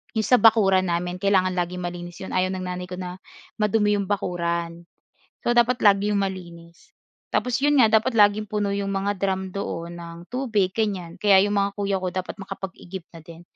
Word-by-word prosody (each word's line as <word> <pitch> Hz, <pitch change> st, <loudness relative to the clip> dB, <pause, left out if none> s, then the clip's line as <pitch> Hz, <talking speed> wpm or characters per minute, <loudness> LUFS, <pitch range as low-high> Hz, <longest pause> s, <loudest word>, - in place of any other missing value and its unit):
'yong 220 Hz, -, +1 dB
sa 250 Hz, -, +5 dB
bakuran 195 Hz, -5 st, +5 dB
namin. 175 Hz, +1 st, -2 dB
Kailangan 190 Hz, -1 st, +2 dB
laging 180 Hz, 0 st, -2 dB
malinis 175 Hz, 0 st, -6 dB
'yon. -, -, -7 dB
Ayaw 185 Hz, 0 st, +1 dB
ng 185 Hz, -, -5 dB
nanay 180 Hz, 0 st, -5 dB
ko 180 Hz, -, -6 dB
na 180 Hz, 0 st, -7 dB, 0.4 s
madumi 210 Hz, 0 st, +2 dB
'yong 195 Hz, -, -3 dB
bakuran. 170 Hz, -3 st, -2 dB, 0.6 s
So -, -, +1 dB
dapat 240 Hz, +1 st, +2 dB
lagi 200 Hz, -1 st, +5 dB
'yong 200 Hz, -, +1 dB
malinis. 170 Hz, -3 st, -8 dB, 0.4 s
Tapos 250 Hz, -1 st, +1 dB
'yon 285 Hz, -1 st, +3 dB
nga, 220 Hz, -, +5 dB
dapat 235 Hz, +4 st, -1 dB
laging 210 Hz, -1 st, +4 dB
puno 210 Hz, -1 st, -2 dB
'yong 200 Hz, 0 st, -2 dB
mga 200 Hz, +1 st, -1 dB
drum 190 Hz, 0 st, -1 dB
doon 175 Hz, -3 st, -5 dB
ng 170 Hz, 0 st, -9 dB
tubig 225 Hz, -7 st, 0 dB
ganyan. 190 Hz, -5 st, -3 dB
Kaya 195 Hz, -2 st, +5 dB
'yong 205 Hz, +1 st, +1 dB
mga 200 Hz, 0 st, +1 dB
kuya 200 Hz, -1 st, -1 dB
ko 185 Hz, -, -3 dB
dapat 185 Hz, +2 st, -4 dB
makapag-igib 190 Hz, -1 st, -7 dB
na 165 Hz, -2 st, -14 dB
din. 165 Hz, 0 st, -12 dB
190 Hz, 190 wpm, -24 LUFS, 180-205 Hz, 0.6 s, sa